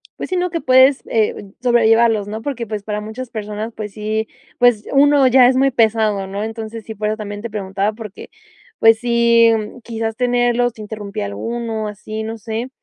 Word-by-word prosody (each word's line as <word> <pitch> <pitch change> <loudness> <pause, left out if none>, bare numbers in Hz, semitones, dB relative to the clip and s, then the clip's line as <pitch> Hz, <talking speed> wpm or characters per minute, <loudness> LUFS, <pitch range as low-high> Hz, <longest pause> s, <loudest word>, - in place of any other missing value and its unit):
pues - - -6
sí, 370 - -1
¿no?, 360 0 0
que 335 -1 -3
puedes, 260 +1 +5
eh, 210 -3 -1
sobrellevarlos, 225 -3 +3
¿no?, 220 +1 -5
porque 245 -3 -4
pues 210 -2 -5
para 210 0 -3
muchas 220 +4 -7
personas, 215 0 -5
pues 210 -1 -6
sí, 215 +1 -3 0.3
pues 245 -4 +3
uno 280 -1 +5
ya 255 0 +6
es 260 - +1
muy 270 +1 +3
pesado, 220 -4 +1
¿no?, 200 +2 -4
entonces 225 -1 -7
sí, 220 - -7
por 210 +1 -2
eso 215 - -2
también 205 -1 -6
te 235 - -5
preguntaba 200 -1 -2
porque, 215 -2 -10 0.5
pues 225 0 +5
sí, 235 -1 +4 0.3
quizás 225 -1 -4
tenerlos 245 -1 +1
interrumpía 205 - -5
alguno 220 - -4
así, 215 +1 -6
no 225 +1 -5
sé, 225 +3 -4
225 Hz, 185 wpm, -18 LUFS, 210-240 Hz, 0.5 s, ya